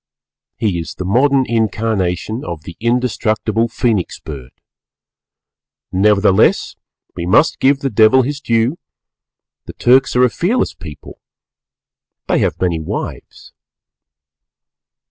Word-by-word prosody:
_ - - -75 0.5
He 100 -6 -1
is 80 - -7
the 90 - -6
modern 130 +6 +2
incarnation 110 -2 -1
of 85 -3 -6
the 85 - -10
indestructible 115 -2 0
Phœnix 115 -5 -1
Bird. 65 -5 -8 1.4
Nevertheless 100 0 +2 0.4
we 85 - -4
must 145 - +3
give 140 +1 +2
the 135 - -2
Devil 110 +5 +5
his 140 +2 -4
due; 115 +6 0 0.9
the - - -9
Turks 130 +2 +3
are 125 - +4
a 125 - +4
fearless 220 +9 0
people; 75 -5 -11 1.1
they - - +1
have - - -1
many 85 -3 0
wives. 80 - -7
110 Hz, 115 wpm, -17 LUFS, 95-125 Hz, 1.4 s, Devil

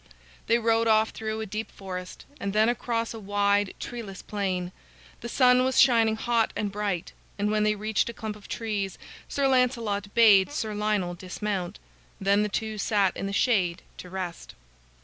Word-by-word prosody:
They 230 - +4
rode 230 0 +2
off 220 0 +4
through 220 0 -4
a - - -3
deep 215 +1 -5
forest, 185 -2 -8
and 200 0 -3
then 215 +2 +4
across 230 -1 -1
a 225 - -7
wide, 205 -1 +1
treeless 215 -6 -7
plain. 185 -3 -2 0.5
The 235 - -6
sun 250 0 +5
was 260 0 +2
shining 230 -3 +5
hot 230 0 +1
and 205 -1 -2
bright, 200 -4 -3 0.2
and 205 +1 0
when 215 0 +1
they 210 0 +2
reached 215 +2 0
a - - -5
clump 220 -1 -5
of 210 - -14
trees, 205 -4 -3 0.3
Sir 280 -1 0
Lancelot 235 -6 +1
bade 210 -2 +6
Sir 220 -7 -3
Lionel 205 -4 0
dismount. 185 +1 -4 0.4
Then 200 +1 +3
the 210 - 0
two 215 +1 -3
sat 200 -3 +2
in 195 - -3
the - - -3
shade 190 -6 +1
to 180 - -9
rest. 180 -2 -6
210 Hz, 175 wpm, -27 LUFS, 195-225 Hz, 0.5 s, bade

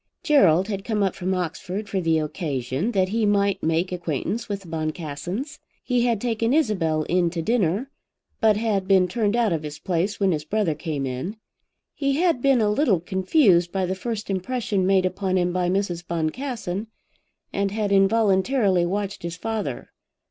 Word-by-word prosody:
Gerald 190 - +4
had 200 -3 -3
come 215 -2 0
up 195 - +1
from 185 +1 -2
Oxford 185 +3 -4
for 195 -2 -1
the 165 -2 +2
occasion 150 - -2
that 190 -2 +2
he 225 +2 0
might 200 -2 +2
make 165 +3 0
acquaintance 175 - -3
with 200 -1 -3
the 185 - -14
Boncassens. 165 - -4 0.2
He 245 -1 +1
had 230 -3 +1
taken 230 +2 0
Isabel 180 - +1
in 175 +1 +1
to 165 0 -3
dinner, 225 - 0 0.5
but 215 -2 +4
had 210 -4 0
been 190 -2 +4
turned 210 +3 0
out 230 -6 +2
of 160 - -1
his 150 -1 -7
place 185 +4 -1
when 195 -2 +3
his 150 -3 -1
brother 200 0 0
came 150 -2 -3
in. 130 - -4 0.6
He 275 -1 0
had 330 -3 +2
been 270 -3 +4
a 210 -1 +2
little 210 - +2
confused 185 - +3
by 190 -1 0
the 185 - -1
first 215 +2 -4
impression 195 -1 -1
made 190 -1 +3
upon 185 0 0
him 175 -1 +1
by 180 -1 0
Mrs. 185 -2 -1
Boncassen, 195 - -3 0.7
and 200 0 0
had 205 0 -2
involuntarily 195 -1 +3
watched 200 +2 -3
his 170 -1 -5
father. 210 - -4
195 Hz, 175 wpm, -24 LUFS, 175-220 Hz, 0.7 s, Gerald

